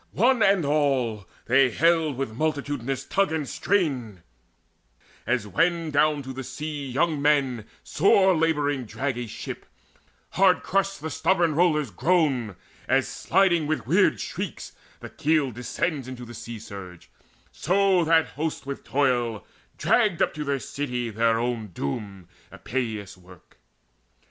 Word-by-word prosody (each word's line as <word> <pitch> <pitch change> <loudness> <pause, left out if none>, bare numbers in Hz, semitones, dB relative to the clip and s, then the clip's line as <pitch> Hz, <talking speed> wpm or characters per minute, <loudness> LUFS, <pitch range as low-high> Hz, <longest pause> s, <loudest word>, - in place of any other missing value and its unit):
One 245 +3 +3
and 195 -6 +4
all 135 - 0 0.2
they 135 +2 +4
haled 160 +1 +2
With 135 -4 -3
multitudinous 140 -2 -2
tug 195 -3 +1
and 155 -3 -2
strain, 130 - -1 1.0
as 120 -2 0
when 165 - 0
Down 150 0 +2
to 130 0 -7
the 130 +1 -6
sea 150 +1 -5
young 150 +3 0
men 135 -6 +1 0.2
sore 190 +2 +4
labouring 145 -5 0
drag 135 +4 -3
A 120 - -4
ship; - - -8 0.6
hard 185 -1 +3
crushed 195 +1 0
the 160 - -4
stubborn 175 -4 +2
rollers 150 -6 +2
groan, 135 - +1 0.3
As, - - +2
sliding 175 -4 +2
with 155 0 -2
weird - - +3
shrieks, - - -5 0.3
the - - -8
keel 150 -3 +1
descends 125 +5 -3
Into 125 -1 -8
the 120 - -10
sea 115 0 -7
surge; 100 -5 -10 0.4
so 190 +1 +2
that 160 0 +4
host 155 -1 -4
with 140 0 -6
toil 120 -7 0 0.3
Dragged 210 -8 +2
up - - +3
unto 150 - -6
their 140 -1 -1
city 125 -4 -4
their 115 +1 +2
own 120 -2 -2
doom, 95 +3 -5 0.2
Epeius' 110 -6 -4
work. 90 -1 -18
140 Hz, 140 wpm, -25 LUFS, 120-160 Hz, 1.0 s, and